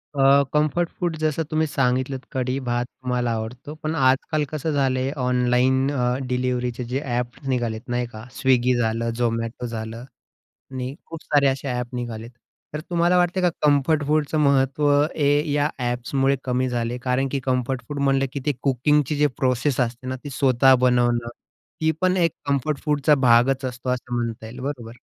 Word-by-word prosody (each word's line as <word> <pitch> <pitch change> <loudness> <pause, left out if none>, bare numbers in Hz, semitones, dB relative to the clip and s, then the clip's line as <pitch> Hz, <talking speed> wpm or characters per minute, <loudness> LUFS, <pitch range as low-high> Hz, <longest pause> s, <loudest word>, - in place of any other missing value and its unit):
अ, 140 0 +5
comfort 155 +3 +1
food, 175 -3 -1
जसं 155 +1 0
तुम्ही 155 0 +1
सांगितलंत, 130 -1 -1
कढी 130 +1 -1
भात 120 0 0
तुम्हाला 125 -2 -2
आवडतो, 120 +6 -6
पण 155 +1 -1
आजकाल 135 +2 +2
कसं 155 +1 -3
झालंय, 135 -2 +1
ऑनलाईन 125 +1 +2
अ, 125 -2 0
डिलिव्हरीचे 125 -1 -1
जे 135 +2 -1 0.2
एप्स 125 +2 -5
निघालेत 120 -4 -1
नाही 120 0 0
का? 110 -2 -10
Swiggy 125 -1 +3
झालं, 115 0 0
Zomato 115 0 -1
झालं 115 0 -6 0.7
आणि 130 0 -4
खूप 165 -1 -9
सारे 145 -2 +3
असे 135 +1 -1
एप 125 0 -6
निघालेत 115 -2 -5 0.4
तर 150 - -3
तुम्हाला 175 +1 +3
वाटते 180 +1 +2
का 180 - +4
कम्फर्ट 150 +1 +3
फूडचं 155 0 +1
महत्त्व 140 0 +2 0.3
हे 145 -2 +2 0.2
या 145 +1 +2 0.2
एप्समुळे 135 +3 0
कमी 130 0 0
झाले, 120 0 -2
कारण 130 +2 +1
की 140 - -1
कम्फर्ट 130 0 -1
फूड 145 -1 -5
म्हटलं, 135 -1 +2
की 140 - -3
ते 150 - +3
कुकिंगची 145 +2 +2
जी 150 +1 +3
प्रोसेस 130 +1 0
असते 125 0 -2
ना, 130 - -2
ती 145 - -6
स्वतः 130 -1 +4
बनवणं, 120 -1 +2 0.5
ती 160 0 +3
पण 185 0 +2
एक 170 -2 +3
कम्फर्ट 140 +1 0
फूडचा 150 0 +3
भागच 125 +3 +4
असतो. 125 0 -5
असं 125 -1 -3
म्हणता 115 -2 -3
येईल, 115 +3 -9
बरोबर? 120 -4 -6
130 Hz, 165 wpm, -23 LUFS, 125-145 Hz, 0.7 s, अ